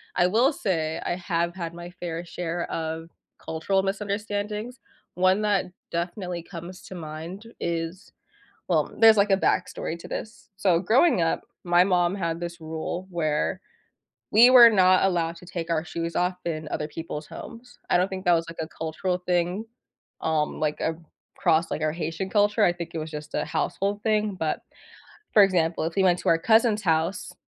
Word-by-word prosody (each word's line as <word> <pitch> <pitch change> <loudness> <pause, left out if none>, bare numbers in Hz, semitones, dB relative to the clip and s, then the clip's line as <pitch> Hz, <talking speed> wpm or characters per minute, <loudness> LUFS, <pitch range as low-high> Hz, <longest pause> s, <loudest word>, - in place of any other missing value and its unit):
I 180 0 +4
will 245 - +3
say, 165 - -1
I 175 - 0
have 175 -1 -1
had 170 -2 -5
my 175 0 -8
fair 175 -2 -5
share 170 0 -4
of 160 0 -4 0.3
cultural 190 +4 0
misunderstandings. 210 +3 -3 0.4
One 185 +3 +3
that 205 -3 +2 0.3
definitely 175 0 -3
comes 175 +1 -9
to 185 - -9
mind 170 +7 -8
is 170 +2 -4 0.6
well, - - +2
there's 225 -1 +8
like 200 0 +3
a 195 - +5
backstory 180 -3 -1
to - - -10
this. 220 - -7
So 185 -4 +3
growing 225 - +4
up, 165 - 0 0.2
my 175 +1 +5
mom 180 -1 +2
had 170 -3 -2
this 170 0 -6
rule 160 +3 -5
where 160 +1 -1 0.7
we 235 +3 +8
were 245 -2 +10
not 185 -3 +5
allowed 170 -3 +1
to 180 - -14
take 170 -1 -5
our 160 -1 +1
shoes 170 -1 -4
off 180 +1 +1
in 155 -2 -3
other 150 - -2
people's 155 -1 -6
homes. 245 +1 -11
I - - +4
don't 180 +2 +2
think 190 -1 -5
that 175 - +5
was, 165 0 +1
like, 165 - -10
a 160 - -4
cultural 160 +4 -3
thing, 180 +4 -1 0.6
um, 155 -1 0
like, 150 -1 0 0.6
across, 160 +1 +2
like, - - -2
our 155 0 +1
Haitian 165 +3 -4
culture. 205 0 +3
I 175 - +5
think 170 -1 -7
it - - -3
was 155 0 -5
just 150 0 -8
a - - 0
household 200 +1 -1
thing 215 -2 +1
but, 160 -1 -1 0.7
for 210 - +8
example, 170 -4 +1
if 165 - -4
we 195 - +3
went 180 -1 +3
to - - 0
our 165 - +5
cousin's 220 +1 +3
house 165 +2 0
175 Hz, 180 wpm, -25 LUFS, 165-195 Hz, 0.7 s, were